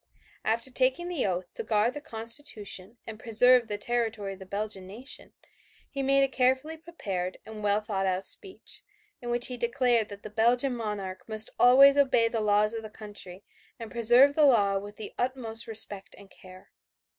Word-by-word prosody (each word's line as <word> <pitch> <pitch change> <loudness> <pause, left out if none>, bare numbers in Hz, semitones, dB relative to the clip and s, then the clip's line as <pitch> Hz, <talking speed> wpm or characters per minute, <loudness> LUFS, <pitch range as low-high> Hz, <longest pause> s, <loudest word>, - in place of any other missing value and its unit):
After 230 +4 -2
taking 265 +7 +1
the 330 - -1
oath 180 -1 -4
to - - -5
guard 220 +2 +1
the 295 - -7
constitution 225 -4 -3
and 220 -1 -9
preserve 240 +2 +4
the 205 -1 -4
territory 220 -3 -2
of 190 - -14
the 190 - -12
Belgian 200 -1 -5
nation, 235 +8 -8 0.5
he 275 - -5
made 275 0 +3
a - - +2
carefully 265 +4 0
prepared 200 - -6
and 220 -1 -9
well 205 0 +1
thought 200 -3 -3
out 185 +1 -1
speech, 385 - +2 0.4
in 240 - -7
which 240 0 +2
he 250 - -2
declared 240 -2 +1
that 200 0 -11
the 215 - -9
Belgian 245 +4 +1
monarch 200 -4 -6
must 215 0 0
always 275 +3 +7
obey 260 -4 +3
the 225 -1 -3
laws 210 +1 +2
of 225 - -5
the 215 - -9
country 205 -3 -10 0.3
and 230 -3 -9
preserve 240 +4 +4
the 305 - +2
law 200 -7 +3
with 205 +1 -10
the 215 - -7
utmost 240 -3 -3
respect 210 -3 +2
and 200 -1 -16
care. 185 0 -16
225 Hz, 180 wpm, -27 LUFS, 205-255 Hz, 0.5 s, always